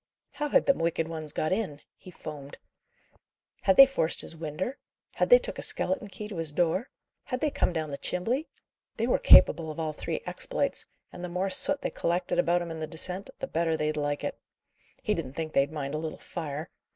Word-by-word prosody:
"How 295 0 -3
had - - +4
them 275 - +3
wicked 165 -1 0
ones 155 -2 -3
got 155 - -1
in?" 190 -9 -2 0.2
he - - -14
foamed. 150 -5 -9 1.0
"Had 190 - +3
they 275 - +12
forced 260 -12 0
his - - -8
winder? 165 - -4 0.3
had - - +1
they - - +10
took - - -5
a - - -3
skeleton 280 -7 0
key 210 +1 -7
to 205 -4 -7
his 165 -2 -2
door? 175 - +1 0.4
had 255 -2 -3
they 300 +1 +1
come - - +1
down 160 -3 -3
the 140 - -5
chimbley? 240 - -1 0.5
They 230 - +1
were 245 - +2
capable 160 0 +7
of 155 - -6
all 155 -1 -1
three - - -4
exploits; - - -2 0.3
and 180 - -8
the 180 - -3
more 185 +2 -1
soot 285 +9 +1
they - - -1
collected 175 +1 0
about 175 0 +3
'em 170 - -6
in 160 - -5
the 155 - -3
descent, 180 +7 -2
the - - -3
better 165 -7 0
they'd 155 0 0
like 145 -1 -1
it. - - -3 0.6
He - - +1
didn't 130 - -4
think 155 +1 -4
they'd 140 +2 +3
mind 145 -2 -4
a 155 - -1
little 160 0 -4
fire. 160 -2 -6
165 Hz, 210 wpm, -28 LUFS, 155-195 Hz, 1.0 s, they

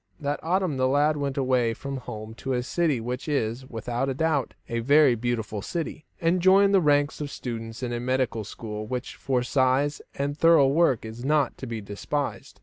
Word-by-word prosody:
That 145 -1 -2
autumn 180 -3 0
the 130 0 +2
lad 145 +3 +3
went 140 -2 -3
away 125 -4 +2
from 140 +2 -5
home 110 -3 -7
to 135 +3 -4
a 125 -1 0
city 155 -1 0
which 125 +5 -4
is, 130 -3 -1
without 125 +3 -3
doubt, 160 -3 0
a 115 - -2
very 140 +2 +5
beautiful 110 -3 -2
city, 165 - -4
and 170 +2 +2
joined 195 +2 +5
the 195 - +5
ranks 145 -1 +2
of 145 - -3
students 115 -2 -6
in 120 -1 -2
a 120 - -2
medical 125 -2 0
school 105 0 -6
which 125 +2 -4
for 125 -2 0
size 130 +3 +1
and 140 +1 -2
thorough 160 -3 +5
work 140 -6 +2
is 110 +2 -8
not 145 -1 +2
to 130 - -6
be 115 -2 -4
despised. 105 +8 -4
130 Hz, 190 wpm, -26 LUFS, 120-145 Hz, -, very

